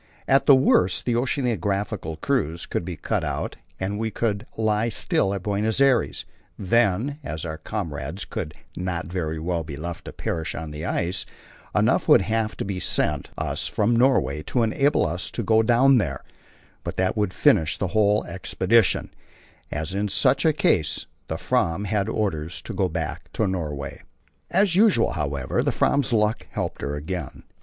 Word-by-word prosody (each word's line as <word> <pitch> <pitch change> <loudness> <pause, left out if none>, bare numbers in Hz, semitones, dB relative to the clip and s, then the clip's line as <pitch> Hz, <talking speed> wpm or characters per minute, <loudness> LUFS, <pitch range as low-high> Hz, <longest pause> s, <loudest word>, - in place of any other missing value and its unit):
At 135 +1 +3
the 140 - +9
worst 95 -8 +3
the 120 - +1
oceanographical 105 - -1
cruise 85 - 0
could - - -2
be 85 -1 -5
cut - - -1
out, - - -3 0.2
and 100 +2 -2
we 110 0 -1
could 105 -1 -2
lie 110 +1 +1
still 100 -2 +1
at 100 -2 -3
Buenos 105 +3 0
Aires; 130 - +2 0.3
then, 115 +7 +1
as 80 - -5
our 80 -1 -5
comrades 80 -3 -4
could 75 -3 -5 0.2
not 90 -2 -3
very 80 -2 -3
well 85 +1 -2
be 75 -2 -7
left 85 +2 -6
to - - -6
perish 80 -2 -3
on 80 -2 -5
the 75 +2 -6
ice, 90 0 -2 0.5
enough - - +2
would - - +7
have 110 +1 -1
to - - -3
be 95 -2 -3
sent 75 -5 +1
us - - -2
from 110 +3 +1
Norway 120 - +3
to 115 - 0
enable 135 +6 +2
us 90 +4 -3
to 120 - -4
go 110 +2 +4
down 125 +3 +5
there; 70 -9 -3 0.6
but - - -5
that 95 0 +1
would 105 -4 0
finish 95 - +3
the 100 - -1
whole 105 +1 +3
expedition, 95 +2 +1 0.6
as 80 +5 -4
in 100 +1 0
such 100 - +2
a 160 - +6
case 85 - +1 0.2
the - - -3
Fram 85 +4 0
had 105 0 0
orders 85 -7 -2
to - - -6
go 95 -2 0
back 80 -2 -4
to 110 - +1
Norway. 75 -6 -4 0.5
As 190 -1 +3
usual, 195 - +4
however, 70 -4 -1
the - - +1
Fram's 140 -2 +1
luck 110 -1 +1
helped - - -3
her 70 +1 -2
again. 75 +1 -5
95 Hz, 170 wpm, -24 LUFS, 80-115 Hz, 0.6 s, the